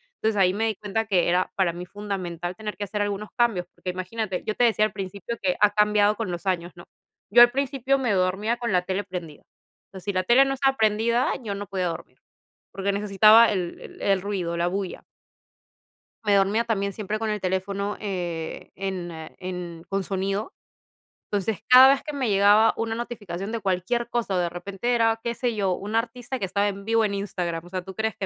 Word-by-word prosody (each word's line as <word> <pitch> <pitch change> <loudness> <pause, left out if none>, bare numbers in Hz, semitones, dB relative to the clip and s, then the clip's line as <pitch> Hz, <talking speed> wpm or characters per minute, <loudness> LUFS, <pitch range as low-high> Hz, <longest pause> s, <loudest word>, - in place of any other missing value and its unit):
Entonces, 220 - -1
ahí 180 -1 +5
me 220 +2 0
di 220 -1 0
cuenta 215 +2 -2
que 185 -5 +2
era 180 +1 +1
para 185 -3 +1
mí 175 +1 -7
fundamental 180 -3 -5
tener 215 0 -6
que 205 - -4
hacer 205 +1 -2
algunos 205 +1 -3
cambios, 220 -8 +1
porque 180 - -4
imagínate, 185 +1 -4
yo 215 - -1
te - - +2
decía 220 -2 +4
al - - -3
principio 200 +3 -5
que 180 -1 +2
ha 210 - +7
cambiado 210 0 +3
con 210 -4 -3
los 175 +3 -6
años, 175 -2 -1
¿no? 175 - -13 0.4
Yo 240 +4 +9
al 240 - +5
principio 275 0 0
me 245 -5 +1
dormía 190 +5 +1
con 235 -2 -2
la 180 -1 +3
tele 190 +2 -2
prendida, 175 -5 -8 0.5
pero 190 - -9
si 200 +2 -3
la 185 0 +1
tele 245 +8 +5
no 270 - -1
estaba 270 0 +1
prendida, 225 +3 +2
yo 205 -3 -3
no 200 +1 -5
podía 190 -2 -1
dormir, 170 - -7 0.5
porque 195 +1 -1
necesitaba 210 +3 +6
el 180 -4 -3
el - - -12
el 195 -2 +2
ruido, 185 -4 -2
la 170 +1 +1
bulla. 190 0 -4 1.2
Me 205 -1 +3
dormía 200 +4 +3
también 200 -4 -1
siempre 215 +1 -3
con 220 0 -2
el 210 -1 -2
teléfono, 195 +2 -2
eh, 175 -5 -4
en 190 -2 -4 0.3
en 180 -3 -6
con 195 0 -1
sonido, 195 - -2 0.8
entonces, 205 0 -1
cada 255 +1 +9
vez 275 0 +2
que 300 - -6
me 265 -5 -1
llegaba 205 +2 +5
una 225 0 -2
notificación 215 -5 -5
de 230 - -2
cualquier 200 +5 -1
cosa 235 -5 -1
o - - +1
de 175 - +1
repente 195 +7 -2
era, 225 -1 +2
qué 235 +1 -3
sé 245 -1 -1
yo, 195 -3 +1
un 205 +4 -6
artista 245 +2 -3
que 195 - -1
estaba 200 +2 +1
en 200 0 -7
vivo 225 0 +3
en 205 -2 0
Instagram, 175 -4 -3
o - - -13
sea, 185 0 -3
¿tú 190 0 -10
crees 220 0 -1
que 195 - -4
200 Hz, 210 wpm, -25 LUFS, 185-225 Hz, 1.2 s, Yo